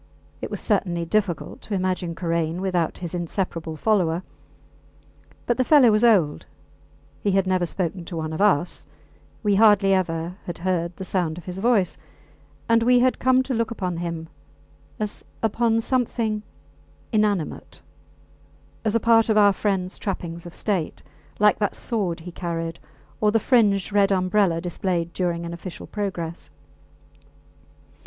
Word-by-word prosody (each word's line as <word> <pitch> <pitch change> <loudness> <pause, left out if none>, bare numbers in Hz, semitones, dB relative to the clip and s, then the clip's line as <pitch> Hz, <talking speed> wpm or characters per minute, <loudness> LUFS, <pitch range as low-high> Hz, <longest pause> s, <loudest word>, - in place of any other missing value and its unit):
It - - -4
was - - -4
certainly 175 -5 0
difficult 190 -3 -1
to 210 - -4
imagine 185 -2 -1
Karain 165 -1 -1
without 180 -3 -1
his 175 -1 -6
inseparable 170 -2 -3
follower; 180 -2 +1 1.2
but 240 - +1
the 255 - +3
fellow 260 -4 +6
was 215 +2 +2
old, 190 -11 +3 0.7
he 200 - +1
had 195 0 +3
never 185 -2 +1
spoken 175 +1 -3
to 170 - -6
one 160 0 -3
of 160 - -3
us, 180 -5 +1 0.6
we 205 -1 +2
hardly 200 -2 +5
ever 175 -1 -1
had 175 - -4
heard 170 -1 -1
the - - -5
sound 175 -4 -1
of 175 - -10
his 180 +1 -5
voice; 210 -5 +2 0.7
and 230 0 +4
we 245 +2 +5
had 255 +1 +3
come 260 0 +4
to 260 - -3
look 230 -1 0
upon 185 -6 -3
him 170 -1 -4 0.7
as 210 -1 -4 0.2
upon 225 +1 +2
something 230 -3 0 0.7
inanimate, 205 -6 -1 1.0
as 220 0 +1
a - - +4
part 225 0 +4
of 215 - +3
our 205 -1 +6
friends 190 -2 -2
trappings 170 -3 -4
of 175 - -11
state 190 -7 -2 0.3
like 210 0 +4
that 205 -2 0
sword 190 -8 -2
he - - -14
had - - -27
carried, 165 -2 -4 0.4
or 210 - +3
the 225 - +3
fringed 210 -5 +2
red 200 -1 +4
umbrella 185 -2 +2
displayed 175 -1 -2
during 170 -2 -1
an 170 - -5
official 170 +1 -8
progress. 170 - -4
190 Hz, 150 wpm, -24 LUFS, 170-215 Hz, 1.2 s, fellow